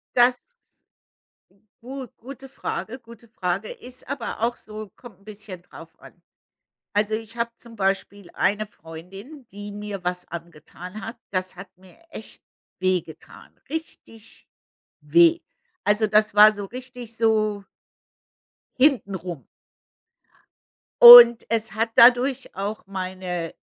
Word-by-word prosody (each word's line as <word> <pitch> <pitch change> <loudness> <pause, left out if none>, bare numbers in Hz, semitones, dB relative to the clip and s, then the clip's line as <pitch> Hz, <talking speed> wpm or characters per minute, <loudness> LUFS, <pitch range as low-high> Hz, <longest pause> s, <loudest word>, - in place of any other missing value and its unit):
Das 245 - +2 1.3
gu 265 +1 -8
gute 270 +2 -11
Frage, 255 -2 -6
gute 235 -1 -17
Frage. 190 -1 -4
Ist 250 +1 -12
aber 235 -5 -6
auch 235 +1 -1
so, 215 -1 -10
kommt 230 -7 -15
'n 200 - -26
bisschen 210 -4 -10
drauf 180 - -15
an. - - -15 0.8
Also, 210 +1 0
ich 225 +1 -7
habe 235 0 -2
zum 235 -1 -15
Beispiel 195 -1 -3
eine 210 +2 0
Freundin, 195 - -13
die 205 +1 -9
mir 205 -2 -7
was 180 0 -4
angetan 170 +4 -10
hat. 230 +2 -8
Das 185 -1 -4
hat 195 +1 -10
mir 185 - -20
echt - - -10 0.4
weh 185 -1 +1
getan, 160 - -15 0.2
richtig 250 -8 -10 0.5
weh. 340 0 +4 0.4
Also, 210 +1 +2
das 215 0 +2
war 210 +1 +8
so 205 -1 -7
richtig 245 0 -10
so 215 -3 0 1.1
hintenrum. 190 - 0 1.6
Und 240 -1 +11
es 225 -1 -2
hat 225 +2 -1
dadurch 250 +2 +4
auch 200 +3 -5
meine 185 -3 -5
215 Hz, 120 wpm, -23 LUFS, 190-240 Hz, 1.6 s, Und